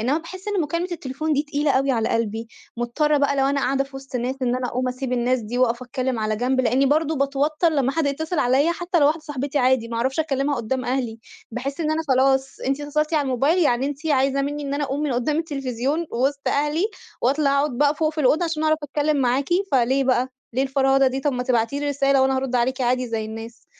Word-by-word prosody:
إنّما 265 +8 +1
باحِس 370 +4 -9
إن 410 -3 0
مكالمة 335 +4 -2
التليفون 310 0 -3
دي 290 0 +2
تقيلة 290 0 -1
أوي 270 0 +2
على 225 -3 0
قلبي، 225 0 -2 0.3
مضطرة 295 +6 +1
بقى 280 0 +1
لو 270 0 +3
أنا 280 0 +1
قاعدة 275 0 +1
في 270 0 -11
وِسط 270 -1 -6
ناس 250 +2 -2
إن 250 0 +1
أنا 255 -1 -2
أقوم 255 +1 -1
أسيب 255 0 -4
الناس 250 +1 +1
دي 225 +3 -4
واقف 245 -1 +1
أتكلّم 255 -1 -2
على 215 0 -1
جنب، 255 +3 +1
لإنّي 260 +2 +2
برضه 310 +2 +1
باتوتّر 285 +4 +1
لمّا 275 -4 +1
حد 320 -2 0
يتصل 315 +4 -2
عليّا 270 +7 +3
حتّى 350 +1 -1
لو 285 - +6
واحدة 315 +2 +1
صاحبتي 290 -1 -3
عادي، 255 -3 +2
ما 230 - -4
أعرفش 260 +6 0
أكلّمها 280 -2 0
قدّام 250 +3 -2
أهلي. 245 -3 -2 0.3
باحس 270 +6 -4
إن 310 -1 0
أنا 315 +1 0
خلاص، 265 0 +2
أنتِ 275 +2 -1
اتّصلتِ 300 +2 -1
على 300 - +3
الموبايل 275 +6 +1
يعني 265 -6 +2
أنتِ 290 +2 -5
عايزة 275 -1 +2
منّي 290 +1 -3
إن 280 0 -2
أنا 290 0 -1
أقوم 275 +2 -3
من 290 -4 0
قُدّام 250 +6 0
التلفزيون 280 0 -2
وِسط 275 +4 0
أهلي 300 +5 +1 0.4
وأطلع 280 +3 +2
أقعُد 280 -4 -2
بقى 290 +1 +3
فوق 310 +1 0
في 310 - -2
الأوضة 305 +6 +3
عشان 320 -2 -2
أعرف 310 0 +3
أتكلّم 295 +1 0
معاكِ 265 +1 +1 0.2
فليه 265 +1 +3
بقى؟ 255 0 +2 0.3
ليه 260 - +2
الفرهدة 270 0 +3
دي؟ 265 +1 -3
طب 285 +1 0
ما 250 -1 -2
تبعتي 250 +2 0
لي 290 - -1
رسالة 275 -1 +2
وأنا 265 0 +2
هارُد 260 -1 -2
عليكِ 260 +2 0
عادي 250 0 +1
زي 225 -1 -2
الناس. 225 +2 -9
270 Hz, 230 wpm, -23 LUFS, 255-295 Hz, 0.4 s, لو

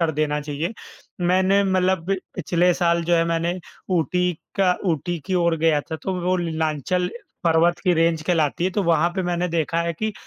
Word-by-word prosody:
कर 165 -1 +2
देना 150 0 0
चाहिए। 150 +5 -3 0.5
मैंने 190 +2 +3
मतलब 185 -2 +1 0.3
पिछले 180 +1 +2
साल 170 -1 +1
जो 175 +1 +2
है 165 - +3
मैंने 170 +2 -1 0.4
ऊटी 180 +2 +1 0.2
का 190 -2 +4 0.2
ऊटी 170 +2 -2
की 190 - -1
ओर 170 -2 +2
गया 160 -2 +3
था 160 +2 -6
तो 190 - -2
वो 180 +1 +1
नीलांचल 160 +1 -1 0.4
पर्वत 170 +1 +3
की 180 - +4
रेंज 165 -1 +2
कहलाती 160 -1 +1
है 185 - +1
तो 200 +2 -1
वहाँ 170 -1 +2
पे 190 - 0
मैंने 175 0 -1
देखा 165 0 0
है 170 0 -1
कि 215 +6 -3
170 Hz, 185 wpm, -22 LUFS, 160-180 Hz, 0.5 s, का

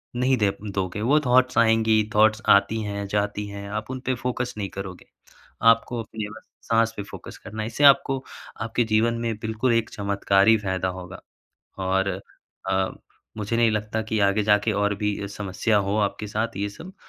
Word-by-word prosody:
नहीं 130 +1 +2
दे 105 -2 +2 0.2
दोगे, 95 +1 -3
वो 140 +7 +4
थॉट्स 125 +1 +3
आएँगी, 110 -1 +4
थॉट्स 110 +1 +4
आती 110 +2 +4
हैं 100 -1 -4
जाती 105 0 -1
हैं, 100 0 -7
आप 110 +2 -4
उन 130 - -4
पे 130 - +1
फोकस 125 0 -3
नहीं 100 -2 -3
करोगे। 95 -2 -8 0.7
आपको 115 +1 -1
अपने 105 0 -6
बस 110 - -13 0.3
साँस 115 0 +3
पे 100 - -3
फोकस - - -10
करना 110 0 -5
है। 110 - -3
इससे 120 +5 -2
आपको 135 -1 +5 0.4
आपके 115 +2 0
जीवन 110 +2 +2
में 115 -2 -2
बिल्कुल 110 +3 0
एक 115 -1 +1
चमत्कारी 100 +1 +3
फायदा 95 -2 -2
होगा। 90 +1 -10 0.7
और 95 +1 +1 0.6
अ, 95 0 +2 0.5
मुझे 110 +2 -2
नहीं 115 -2 +4
लगता 105 +1 -2
कि 110 - 0
आगे 100 +1 +2
जाके 105 +1 +3
और 100 0 0
भी 105 0 -1
अ, - - -4
समस्या 105 +2 -1
हो 100 +1 0
आपके 105 0 -1
साथ 110 +1 -2
ये 100 +1 -2
सब, 170 - -11
110 Hz, 185 wpm, -24 LUFS, 100-115 Hz, 0.7 s, आपको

